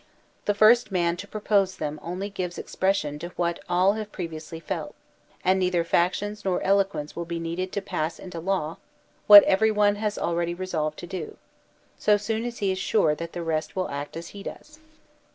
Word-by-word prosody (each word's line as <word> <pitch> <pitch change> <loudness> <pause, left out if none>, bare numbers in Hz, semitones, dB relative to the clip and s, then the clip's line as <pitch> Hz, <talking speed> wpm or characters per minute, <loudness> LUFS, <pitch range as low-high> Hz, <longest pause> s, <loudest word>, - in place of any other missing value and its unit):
The 205 - +1
first 215 +2 +5
man 170 -2 +1
to 200 - -7
propose 200 -2 +1
them 150 0 -4
only 180 +4 -4
gives 180 -3 -4
expression 170 -7 -1
to 170 - -5
what 170 -1 -1
all 180 +3 +4
have 215 -1 -5
previously 165 -2 -6
felt, 165 - -5 0.5
and 190 +1 +4
neither 180 -2 +1
factions 205 +5 0
nor 185 -2 0
eloquence 195 -6 +1
will 170 - -4
be 170 0 -4
needed 170 +3 -3
to 200 - -2
pass 160 -3 -2
into 180 -3 -8
law 170 -3 -1 0.5
what 205 -1 +12
every 220 +3 +3
one 205 -1 +3
has 210 0 -2
already 170 0 -1
resolved 160 -5 -2
to - - -7
do, 175 -3 -6 0.6
so 210 -1 +4
soon 220 +2 -2
as 240 -1 -5
he 200 -2 0
is 185 - -2
sure 175 -8 +2
that 170 +2 -6
the 175 - -4
rest 155 -1 -2
will 185 -1 -1
act 145 +3 -5
as 170 0 -7
he 200 - -10
does. 305 +9 -10
185 Hz, 190 wpm, -26 LUFS, 170-205 Hz, 0.6 s, what